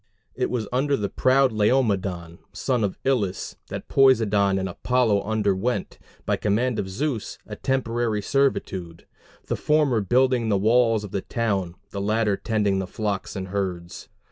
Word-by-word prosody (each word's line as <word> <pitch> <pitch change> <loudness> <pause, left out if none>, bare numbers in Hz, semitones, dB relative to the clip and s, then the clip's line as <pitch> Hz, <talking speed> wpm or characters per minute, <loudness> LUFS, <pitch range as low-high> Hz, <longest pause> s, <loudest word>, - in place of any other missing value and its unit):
It - - -1
was 115 -4 -2
under 140 +2 +1
the 100 -2 -2
proud 130 0 +3
Laomedon, 100 -7 0
son 125 -4 0
of 100 - -2
Ilus, 110 -9 -1
that - - -7
Poseidon 105 -7 +4
and 95 0 -1
Apollo 110 +2 +1
underwent, 105 0 -1 0.3
by - - +1
command 110 +3 0
of 95 - -3
Zeus, 120 +2 -3
a - - -7
temporary 120 -5 -1
servitude; 95 -12 -1 0.4
the - - -1
former 150 -7 +2
building 125 +3 +2
the 100 - +3
walls 115 +1 +3
of 105 - -8
the 100 - -2
town, 100 -7 -2 0.2
the 100 - -4
latter 105 0 +1
tending 105 -3 0
the 95 - -3
flocks 100 0 -3
and 95 -1 -5
herds. 90 -3 -4
105 Hz, 150 wpm, -24 LUFS, 100-125 Hz, 0.4 s, Poseidon